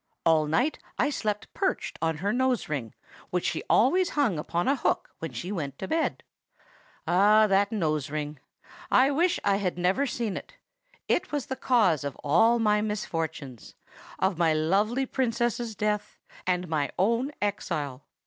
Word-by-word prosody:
All 160 -2 +4
night 250 - +1 0.2
I 290 +4 +2
slept 215 -4 -3
perched 380 -2 -2
on 160 -1 0
her 205 - +2
nose 255 -1 +1
ring, 130 -8 -4 0.3
which 180 -1 -1
she - - -1
always 360 +10 +4
hung 225 - +2
upon 170 +3 -2
a 275 - +3
hook 265 - -1
when 165 -3 -5
she 125 - -5
went 145 -8 -4
to 190 - -5
bed. 320 +6 -1 0.8
"Ah! 205 +5 +5
that 200 +1 +2
nose 155 -9 -1
ring! 150 -1 -4 0.5
I 265 +3 +5
wish 340 +5 +2
I 200 -1 +3
had 185 -3 -2
never 185 +11 +1
seen 230 -5 -2
it. - - -10 0.5
It - - 0
was 290 -2 -2
the 265 - -4
cause 215 - +2
of 140 -2 -4
all 225 +11 +4
my 210 -2 +2
misfortunes,—of 165 - -4
my 165 -2 +3
lovely 205 +11 +1
Princess's 240 -3 -1
death 210 0 -2 0.3
and 180 0 0
my 155 -3 0
own 235 +8 +1
exile. 145 -9 -3
200 Hz, 160 wpm, -27 LUFS, 160-240 Hz, 0.8 s, Ah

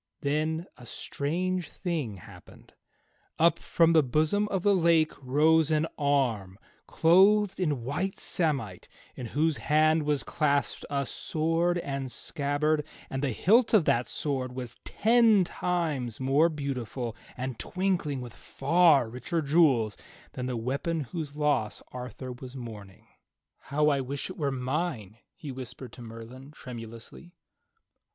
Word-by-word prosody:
Then 155 +3 -1
a 125 - -13
strange 175 +7 -2
thing 160 - -3
happened. 90 - -15 0.6
Up 170 +2 +4
from 165 0 +3
the 160 - +6
bosom 155 +10 +1
of 195 -3 -2
the 205 - +4
lake 165 -3 +3
rose 155 +4 +3
an 155 0 +2
arm 125 -10 0 0.3
clothed 195 +5 +4
in 150 -9 0
white 165 +10 -2
samite 135 - -1 0.3
in 125 - -6
whose 155 +5 +1
hand 155 +1 +3
was 150 -1 0
clasped 145 -2 0
a 140 -1 -1
sword 165 +5 0
and 140 -5 -4
scabbard, 145 +4 0 0.3
and 135 - -2
the 140 - +1
hilt 225 - +4
of 185 -7 +4
that 120 +1 +2
sword 130 -4 -2
was 125 -2 -6
ten 225 -3 +4
times 160 -10 -2
more 140 +5 +3
beautiful 130 -6 -4 0.2
and 130 -2 -4
twinkled 180 -8 -1
with 120 -2 -8
far 150 -2 +3
richer 125 +9 -3
jewels 140 -8 +3 0.3
than 125 0 -4
the 125 -2 -2
weapon 140 +8 -2
whose 150 +1 -6
loss 145 -8 0
Arthur 125 0 -7
was 125 +1 -9
mourning. 105 -6 -9 0.6
"How 150 +2 +2
I 140 -2 +1
wish 140 +6 -4
it - - -10
were 145 -2 +1
mine," 130 - -3 0.2
he 150 -6 -7
whispered 130 0 -8
to 125 - -11
Merlin 115 +4 -10
tremu 120 -6 -8
lously. 115 +10 -12
145 Hz, 140 wpm, -28 LUFS, 125-165 Hz, 0.6 s, the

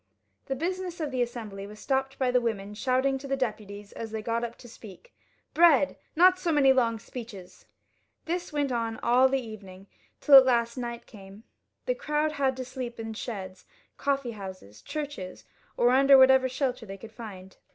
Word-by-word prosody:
The 270 - -2
business 360 +3 -4
of 305 -3 -3
the 255 -1 -1
Assembly 220 -5 -5
was 210 +1 -12
stopped 270 +1 -1
by 255 -2 +1
the 250 0 +3
women 210 -3 -3
shouting 260 +4 0
to 275 - -8
the 275 0 -1
deputies 210 -5 -5
as 225 - -7
they 220 0 -5
got 230 +1 -1
up 235 0 -4
to 245 - -13
speak, 225 - -14 0.2
" - - -44
Bread! 315 -4 +5 0.2
Not 365 +3 +5
so 345 -3 -1
many 275 -3 +5
long 235 -3 +1
speeches." 215 -5 -10 0.6
This 350 +1 -3
went 290 -2 -1
on 230 -2 -2
all 250 +2 +4
the 270 - +1
evening, 200 -5 -10 0.3
till 295 - +1
at 265 - +8
last 235 -2 +1
night 235 -2 -5
came. 195 0 -14 0.4
The - - +1
crowd 310 -11 -1
had 270 -3 0
to 255 - -5
sleep 250 -2 -7
in 225 0 -5
sheds, 190 -5 -7 0.3
coffee 275 -3 -1
houses, 190 - -10
churches, 285 -11 -6 0.3
or 240 +1 +4
under 275 +1 +6
whatever 260 0 +6
shelter 250 -3 -2
they 195 0 -7
could 220 +3 -12
find. 195 -5 -10
245 Hz, 185 wpm, -27 LUFS, 215-275 Hz, 0.6 s, at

